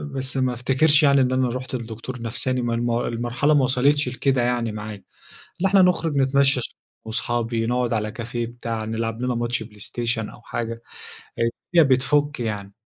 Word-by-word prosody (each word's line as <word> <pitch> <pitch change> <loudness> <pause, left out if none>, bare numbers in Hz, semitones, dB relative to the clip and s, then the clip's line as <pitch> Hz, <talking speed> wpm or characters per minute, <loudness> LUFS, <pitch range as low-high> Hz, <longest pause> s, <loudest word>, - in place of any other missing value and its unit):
بس 135 +1 -2
ما 130 -1 +1
افتكرش 135 +5 +3
يعني 140 -1 +5
إن 130 0 +2
أنا 130 -1 +2
رُحت 130 +1 -4
لدكتور 115 +1 -6
نفساني، 125 +2 0
ما 120 -1 -1
الم 120 +1 0
المرحلة 120 +5 0
ما 145 -3 +4
وصلتش 135 +2 +2
لكده 130 0 +1
يعني 120 -2 0
معايا. 105 -2 -7 0.6
لأ 195 - +3
إحنا 195 0 +5
نخرج 170 -4 +2
نتمشى 135 0 +3
شوية - - -6 0.3
وصحابي 115 0 -1
نقعد 125 0 0
على 110 -1 -1
كافيه 120 0 -4
بتاع 115 -1 -5
نلعب 115 +1 -3
لنا 125 0 0
ماتش 120 -1 -1
بلايستيشن 110 +1 -3
أو - - -14
حاجة، 115 0 -4 0.6
الدنيا 120 +8 +2
بتفك 145 +3 +2
يعني. 105 -4 -4
120 Hz, 170 wpm, -23 LUFS, 115-130 Hz, 0.6 s, يعني